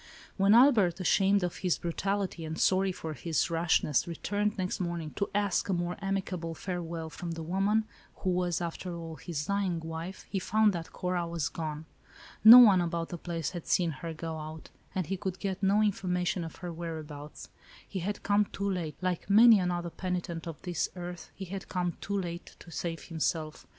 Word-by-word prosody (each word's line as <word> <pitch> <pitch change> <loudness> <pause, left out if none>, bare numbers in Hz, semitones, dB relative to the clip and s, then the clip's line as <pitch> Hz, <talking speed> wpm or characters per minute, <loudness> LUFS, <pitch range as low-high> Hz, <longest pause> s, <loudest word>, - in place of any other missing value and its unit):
When 200 +2 +5
Albert, 220 -9 +5
ashamed 195 +2 +3
of 175 - -2
his 180 -3 +1
brutality, 190 +1 -2
and 160 0 -5
sorry 190 0 +3
for 160 -3 -6
his 165 +2 -1
rashness, 165 -4 +2
returned 205 +5 -1
next 185 -1 -2
morning 170 -4 -3
to 200 - -2
ask 205 -2 +1
a - - +2
more 175 0 -1
amicable 185 -4 -2
farewell 170 -3 -4
from 170 +3 -5
the 165 0 -5
woman, 195 +6 +1 0.3
who 185 - -1
was, 180 -1 0
after 170 +1 -4
all, 165 -1 -7
his 150 -1 -4
dying 195 -3 0
wife, 165 +3 -6
he 195 - -2
found 215 +2 +3
that 165 -2 -5
Cora 180 -1 -2
was 170 -3 -2
gone. 155 -1 -5 0.6
No 225 +3 +13
one 205 -7 +8
about 170 -1 -2
the 175 - -5
place 165 -2 -3
had 175 -3 -7
seen 175 -3 +2
her 165 +4 -6
go 160 0 -5
out, 155 +1 -8 0.2
and 185 -2 0
he 195 +5 -2
could 190 -1 -4
get 195 -1 -3
no 200 +2 +4
information 180 -3 0
of 165 - -7
her 175 - -4
whereabouts. 155 -3 -7 0.4
He 195 - -4
had 200 +4 -3
come 205 +1 +3
too 200 0 -4
late; 175 -6 -2
like 185 0 -2
many 220 +1 +8
another 175 -1 -1
penitent 175 -2 -4
of 165 -3 -6
this 175 -3 -1
earth, 175 -1 -7
he 195 - -6
had 190 +1 -7
come 175 -2 -1
too 200 0 -1
late, 175 -2 -6
to 170 - -13
save 165 +2 -4
himself. 160 -1 -3
175 Hz, 190 wpm, -30 LUFS, 165-195 Hz, 0.6 s, No